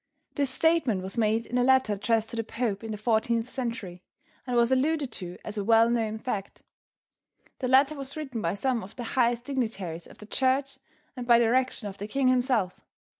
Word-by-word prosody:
This 280 -2 0
statement 315 - +2
was 190 +1 -4
made 225 0 +1
in 250 - -1
a - - +3
letter 260 -4 +4
addressed 220 +2 0
to - - -5
the 225 - -1
Pope 225 -2 -3
in 225 - -6
the 215 - -3
14th 225 +2 +1
century 230 -9 -5 0.5
and 245 -1 0
was 235 +1 +3
alluded 280 0 +1
to 180 -4 -7
as 215 0 -4
a - - -1
well 225 +2 +5
known 220 -2 0
fact. 210 -4 -5 1.0
The 255 - -1
letter 270 +3 +5
was 275 0 -7
written 265 -7 -4
by - - -1
some 245 +2 0
of 190 - -11
the 245 - -5
highest 240 -1 +2
dignitaries 210 - -3
of - - -15
the 210 - -11
church 265 +3 0 0.4
and 250 -2 -6
by 235 -1 +7
direction 235 -1 +1
of 200 -1 -8
the 205 - -4
king 260 +4 +1
himself. 245 -7 +1
235 Hz, 200 wpm, -27 LUFS, 215-260 Hz, 1.0 s, by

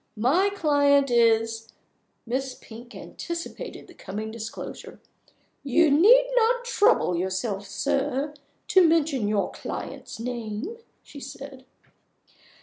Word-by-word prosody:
My 305 - +3
client 285 -7 +3
is 225 -1 +2 0.3
" - - -47
Miss 260 +2 -3
Pink 235 +2 -13
anticipated 340 0 -7
the - - -16
coming 215 +3 -6
disclosure. 225 0 -8 0.6
"You 295 +3 +3
need 460 - +6
not 480 +1 +2
trouble 445 - +3
yourself, 190 +3 -2
sir, 280 +1 -1 0.4
to 370 -3 +6
mention 300 -8 +1
your 205 -1 0
client's - - -7
name," 240 - -5 0.3
she 285 - -12
said. 270 -1 -10
270 Hz, 110 wpm, -25 LUFS, 225-325 Hz, 0.6 s, need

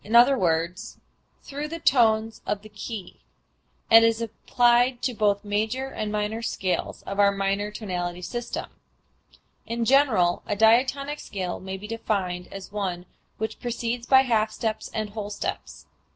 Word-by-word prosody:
e._, 210 -5 +3 0.5
through 285 +2 -5
the 330 +2 -5
tones 225 -7 +2
of 205 0 -2
the 215 - -12
key), 205 -2 -7 0.7
and 225 0 +9
is 230 0 +3
applied 240 +2 +2
to 250 - -1
both 210 -2 +1
major 220 +6 -1
and 215 -5 -4
minor 210 +2 -2
scales 190 -5 -2
of 200 +1 -5
our 200 0 +6
modern 200 +1 -1
tonality 180 -5 -4
system. 240 +5 -4 1.0
In 230 0 -1
general 225 -10 +3
a 205 - 0
diatonic 260 +7 +3
scale 185 -3 -4
may 190 0 -6
be 200 - -9
defined 195 -5 -2
as 195 0 -8
one 185 -4 -3 0.3
which 220 0 -4
proceeds 240 0 -3
by 265 -1 +7
half 220 -4 +1
steps 220 0 -3
and 215 -1 -3
whole 210 -1 -5
steps. 205 - -5
220 Hz, 145 wpm, -25 LUFS, 200-240 Hz, 1.0 s, and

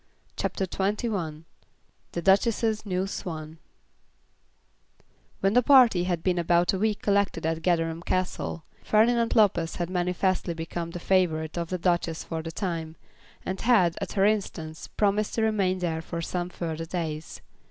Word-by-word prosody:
CHAPTER 190 - -1
XXI 190 -5 -2 0.7
The 170 - -3
Duchess's 215 +3 +2
New 185 0 0
Swan 160 -4 -6 1.8
When 195 +1 +2
the 250 - +6
party 245 -9 +6
had 175 -3 -1
been 180 -2 +1
about 175 +1 +3
a 190 - -1
week 215 0 0
collected 200 -5 +1
at 165 0 -1
Gatherum 165 -2 0
Castle, 180 -2 -2 0.2
Ferdinand 230 +2 +3
Lopez 180 -7 +3
had 175 0 -3
manifestly 180 0 0
become 165 +1 -4
the 175 - -6
favourite 165 -4 +1
of 170 -1 -3
the 185 - -1
Duchess 170 -2 0
for 165 -1 -4
the 165 0 -6
time, 165 -4 -4 0.5
and 190 0 -3
had, 200 -8 +4
at - - -4
her 195 -1 +3
instance, 170 -7 -2
promised 210 0 0
to 225 - +1
remain 200 -4 +1
there 165 -3 -2
for 170 +1 -5
some 175 +1 -3
further 165 -2 -4
days. 160 -2 -4
180 Hz, 150 wpm, -27 LUFS, 165-200 Hz, 1.8 s, the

